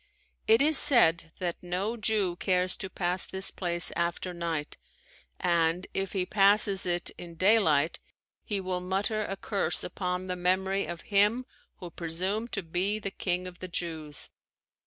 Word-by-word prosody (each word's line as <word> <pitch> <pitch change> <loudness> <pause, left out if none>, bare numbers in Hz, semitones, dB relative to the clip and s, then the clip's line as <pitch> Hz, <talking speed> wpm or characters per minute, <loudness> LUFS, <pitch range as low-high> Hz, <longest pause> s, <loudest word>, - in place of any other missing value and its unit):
It 225 +4 +6
is 305 0 +6
said 165 - +6
that 175 -2 -4
no 185 +6 -2
Jew 210 -5 +1
cares 180 -1 +1
to 190 - -6
pass 180 0 -1
this 190 0 -5
place 175 -2 0
after 170 +1 -2
night 165 -3 -4 0.6
and 170 0 +1
if 195 -1 -2
he 190 -2 0
passes 200 -1 +3
it 175 0 -1
in 170 -1 -9
daylight 170 -5 +3 0.4
he 205 -3 -3
will 185 -1 -3
mutter 200 +4 -1
a 195 -1 -5
curse 200 0 0
upon 180 0 -3
the 180 -1 -3
memory 190 +2 0
of 170 -2 -6
him 210 +5 +3 0.3
who 175 -2 -9
presumed 185 +8 -3
to 200 - -2
be 180 +5 -1
the 200 -2 -5
King 180 -1 -2
of 180 -1 -10
the 185 - -6
Jews. 160 -4 -4
185 Hz, 155 wpm, -28 LUFS, 175-200 Hz, 0.6 s, It